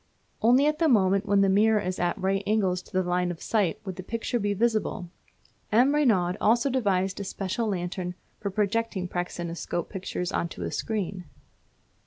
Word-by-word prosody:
Only 250 +5 +5
at 300 0 +1
the 330 - +3
moment 200 -3 +3
when 200 0 +4
the 195 - +4
mirror 210 +3 +4
is 185 -2 -3
at 175 0 0
right 195 +1 0
angles 195 -4 +1
to - - -20
the 185 0 +1
line 180 0 +1
of 175 -2 -5
sight 205 -5 0
would 190 -2 -5
the - - -4
picture 230 +4 -2
be 205 -1 0
visible. 215 -5 0 0.6
M. 250 +6 +4
Reynaud 205 -11 +2
also 240 +5 +3
devised 195 -7 0
a - - -3
special 195 +4 -3
lantern 180 -2 -3 0.2
for 200 - -3
projecting 210 -1 -1
praxinoscope 175 -1 -4
pictures 180 -2 -4
on 170 - -1
to 90 - -7
a 85 - -3
screen. 195 -4 -3
195 Hz, 180 wpm, -27 LUFS, 180-220 Hz, 0.6 s, Only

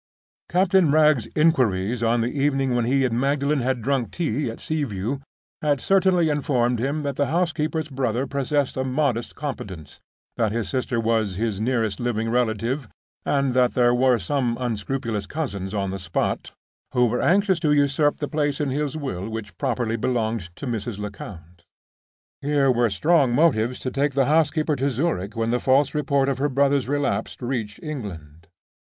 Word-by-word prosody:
Captain 185 -2 +3
Wragge's 150 -5 +4
inquiries 125 - +2
on 115 0 +2
the 120 +4 -2
evening 135 -2 +1
when 120 -1 +1
he 135 +2 +2
and 120 -1 0
Magdalen 140 +2 +1
had 125 -2 -1
drunk 130 -4 0
tea 145 -6 -1
at 115 - -7
Sea 155 -1 -2
View 115 +3 -3 0.4
had 145 -2 +1
certainly 185 -2 +3
informed 125 -5 +1
him 140 +5 -1
that 140 -2 -3
the 145 - +1
housekeeper's 160 -1 0
brother 130 -3 -1
possessed 140 0 -1
a 130 - 0
modest 130 -3 -1
competence; 95 - -7 0.4
that 110 -3 +1
his 115 0 -2
sister 130 -2 -1
was 110 -4 0
his 105 0 -2
nearest 110 -4 0
living 115 -2 -1
relative; 120 +2 0 0.4
and 140 -2 +1
that 125 -1 +2
there 120 -1 +4
were 125 0 +4
some 120 +3 -1
unscrupulous 115 -1 -2
cousins 100 -12 -4
on 100 -2 -2
the 95 - -4
spot 90 -2 -2 0.4
who 125 0 +5
were 120 +1 0
anxious 190 0 +3
to 155 -2 +1
usurp 145 0 +2
the 145 - -3
place 145 -2 -1
in 145 -3 -1
his 145 +1 -2
will 110 - -4
which 110 -1 -6
properly 115 -2 -1
belonged 110 -5 -1
to 145 - -7
Mrs. 115 -3 -3
Lecount. 90 -4 -9 0.8
Here 140 -2 +2
were 120 -1 +2
strong 135 - +3
motives 125 -6 +2
to 130 - -3
take 140 0 0
the 135 -1 +3
housekeeper 155 +1 +2
to 135 +2 +1
Zurich 115 - -2
when 115 0 0
the 125 - +1
false 135 +3 +3
report 140 -2 +1
of 135 -2 -1
her 145 +2 +1
brother's 140 0 +2
relapse 135 -7 -1
reached 120 -5 -3
England. 85 - -7
130 Hz, 170 wpm, -23 LUFS, 115-145 Hz, 0.8 s, who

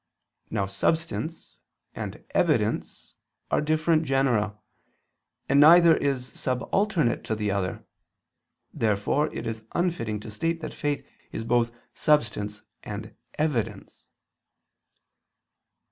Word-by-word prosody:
Now 100 - 0
"substance" 160 - -2 0.4
and - - -6
"evidence" - - 0 0.3
are - - +3
different 155 +1 +2
genera, 125 -7 +1 0.9
and 140 - +4
neither 165 +2 +8
is 135 -4 -1
subalternate 155 - 0
to 110 - -1
the 105 -1 -1
other. 95 -2 -2 0.9
Therefore 110 +8 +1
it - - -5
is 115 -1 -4
unfitting 165 -12 -1
to 110 - -8
state 165 +10 -1
that 155 - -5
faith 145 -1 -2 0.3
is - - -4
both 120 0 +2 0.2
"substance" 105 -8 +1 0.2
and 105 +1 -7 0.2
"evidence." 150 -8 -2
130 Hz, 100 wpm, -26 LUFS, 105-155 Hz, 0.9 s, neither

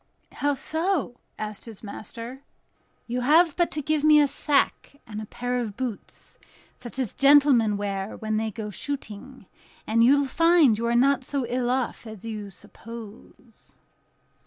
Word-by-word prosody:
"How 285 0 0
so?" 320 -4 -1 0.2
asked 210 -1 -6
his 225 -3 -11
master. 230 +5 -8 0.6
"You 245 +1 -3
have 310 +5 +4
but 345 -1 +2
to 300 - -4
give 305 0 0
me 305 -1 +7
a 290 - +4
sack 285 0 0
and 215 -1 -7
a 215 - -8
pair 245 +2 -3
of 220 -4 -5
boots, 245 -5 -7 0.4
such 240 +1 -10
as 255 -6 -2
gentlemen 275 -7 +5
wear 200 0 -4
when 215 -1 -2
they 220 0 -1
go 215 -1 -6
shooting, 260 -1 -7 0.4
and 230 +1 +3
you 270 +4 +6
will - - 0
find 330 -4 +4
you 230 +2 -2
are 235 - +1
not 270 +2 +3
so 275 0 -2
ill 245 +1 -1
off 250 -2 -2
as 220 -1 -10
you 215 -3 -5
suppose." 225 +3 -13
245 Hz, 160 wpm, -25 LUFS, 220-280 Hz, 0.6 s, me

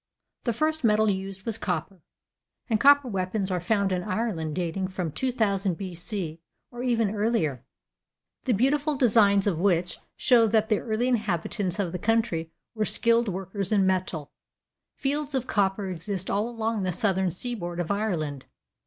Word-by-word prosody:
The 235 - +1
first 310 +5 0
metal 215 -1 +4
used 190 0 -5
was 225 -2 -3
copper, 180 0 -3 0.7
and 220 -4 +1
copper 285 +1 +6
weapons 190 -1 -2
are 180 - 0
found 200 +2 +1
in 180 -1 0
Ireland 185 -7 -2
dating 180 +1 -2
from 185 -4 -4
2,000 200 - 0
B.C., 175 -3 -4 0.3
or 240 -1 -7
even 230 -4 +1
earlier, 205 - 0 0.8
the 255 - +2
beautiful 285 +7 +2
designs 205 -5 +4
of 185 -6 0
which 180 -2 +1 0.2
show 235 -3 +4
that 220 0 +2
the 215 - +3
early 225 +2 -1
inhabitants 205 -4 -1
of 195 -5 -1
the 180 - -4
country 220 -8 0 0.2
were 215 -2 -1
skilled 230 +2 +3
workers 195 +1 -4
in 200 -3 +4
metal. 180 -6 -1 0.6
Fields 285 +1 -1
of 255 -2 0
copper 195 -3 0
exist 185 +2 -4
all 210 +4 0
along 225 -2 -2
the 185 -1 0
southern 190 0 +1
seaboard 175 -2 -3
of 175 0 -1
Ireland. 165 -10 -2
200 Hz, 155 wpm, -26 LUFS, 180-230 Hz, 0.8 s, copper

